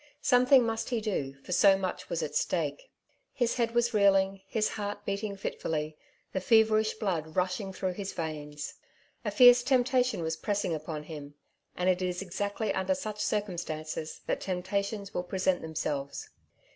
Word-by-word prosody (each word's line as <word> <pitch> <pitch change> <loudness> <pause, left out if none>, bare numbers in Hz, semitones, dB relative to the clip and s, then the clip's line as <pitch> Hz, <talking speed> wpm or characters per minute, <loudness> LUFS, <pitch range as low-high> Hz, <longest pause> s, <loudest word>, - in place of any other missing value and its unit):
Something 250 0 +6
must 225 0 -2
he 240 -2 0
do, 165 -11 -2
for - - -9
so 195 +2 +6
much 190 -1 -4
was - - -1
at - - -4
stake. - - -1 0.4
His 240 -2 +1
head 235 -1 0
was 240 0 +2
reeling, 195 -2 +3
his 215 0 +1
heart 205 -1 -5
beating 200 +1 -2
fitfully, 155 -5 -3 0.4
the 190 - -1
feverish 220 0 +4
blood 170 -8 -2
rushing 185 +2 0
through 185 -1 -2
his 195 +1 -5
veins. 150 -2 -5 0.5
A - - -1
fierce 245 -1 +8
temp 250 -1 +3
tation 255 -7 +1
was 160 0 -2
pressing 205 -4 -1
upon 155 -1 -4
him; 145 -2 -9 0.4
and 180 - 0
it 185 0 +3
is 180 +1 -2
exactly 205 +4 -2
under 190 0 +1
such 210 +2 -5
circumstances 160 -7 -3
that - - -1
temptations 200 +2 -2
will - - 0
present 185 0 0
themselves. 145 -3 -4
195 Hz, 160 wpm, -30 LUFS, 170-220 Hz, 0.5 s, fierce